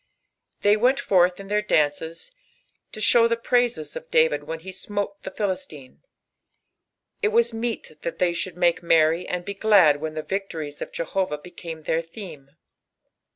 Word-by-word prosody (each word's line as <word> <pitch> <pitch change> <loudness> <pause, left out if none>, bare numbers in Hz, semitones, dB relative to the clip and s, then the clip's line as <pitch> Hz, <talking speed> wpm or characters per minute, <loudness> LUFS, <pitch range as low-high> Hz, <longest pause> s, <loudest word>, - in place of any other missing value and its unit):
They 205 +1 +5
ivtiii 250 +5 +3
forth 180 -7 +3
in 195 - -9
their 210 +1 +1
fiances 160 - 0 0.6
to - - -8
sing 230 +2 +5
tlie 230 0 -2
praises 245 -1 +1
cf - - -8
Daoid 480 0 +3
jchen 160 0 -5
he 190 +3 -8
smote 200 +1 -4
the - - -6
Philisliae, 170 -10 -5 1.2
il 425 - +3
was 465 - +3
meet 225 -9 -4
that 165 0 -4
they 180 -1 +2
should 170 0 -4
taake 175 -1 +2
merry 165 0 +3
and 180 -1 -3
be 200 - -4
glad 195 -8 +5
uhen 155 +1 -5
tha 155 - -3
inctories 165 -7 -4
of - - -5
Jehovah 170 -1 -2
became 165 0 -9
their 160 +1 0
theme. 165 -5 -11
185 Hz, 160 wpm, -24 LUFS, 160-215 Hz, 1.2 s, They